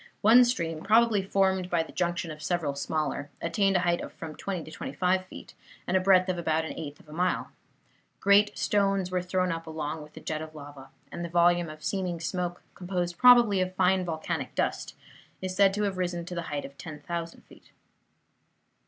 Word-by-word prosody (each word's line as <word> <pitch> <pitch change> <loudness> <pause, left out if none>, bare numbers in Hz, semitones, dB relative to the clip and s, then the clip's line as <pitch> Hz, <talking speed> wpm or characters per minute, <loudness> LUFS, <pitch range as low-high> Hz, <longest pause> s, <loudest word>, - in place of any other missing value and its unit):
One 235 +4 +8
stream, 165 -10 -2
probably 220 +1 +4
formed 190 -1 +1
by 170 -2 +1
the - - -12
junction 175 -1 -2
of 155 0 -9
several 160 -2 -1
smaller, 145 0 -2
attained 195 +4 +1
a 180 - +3
height 175 -1 +1
of - - -7
from 160 -2 -8
twenty 185 -4 -4
to 155 - -11
twenty - - -6
five 185 0 +1
feet, - - -11 0.3
and 180 - -1
a - - +5
breadth 185 0 +4
of 180 -2 -1
about 160 -1 0
an - - -5
eighth 150 -3 -7
of - - -20
a 150 - -12
mile. 180 +3 -1 0.7
Great 200 +1 +4
stones 195 -2 +1
were 180 0 0
thrown 185 0 0
up 165 0 -5
along 155 0 -4
with 150 0 -13
the - - -10
jet 155 -1 -4
of 155 0 -9
lava, 140 -2 -11 0.2
and 170 - -5
the 170 - -4
volume 175 0 +3
of 155 0 -11
seeming 180 0 -2
smoke, 175 +1 -3
composed 175 -1 -3
probably 240 -6 +7
of 185 0 -2
fine 185 0 +3
volcanic 160 -3 -4
dust, - - -2 0.4
is 185 -1 -4
said 195 0 +5
to 210 - -1
have 195 -2 -2
risen 175 -1 -2
to 180 - -7
the 170 - -3
height 145 -1 -3
of 140 0 -12
10,000 165 +2 -6
feet. - - -19
175 Hz, 205 wpm, -28 LUFS, 160-190 Hz, 0.7 s, One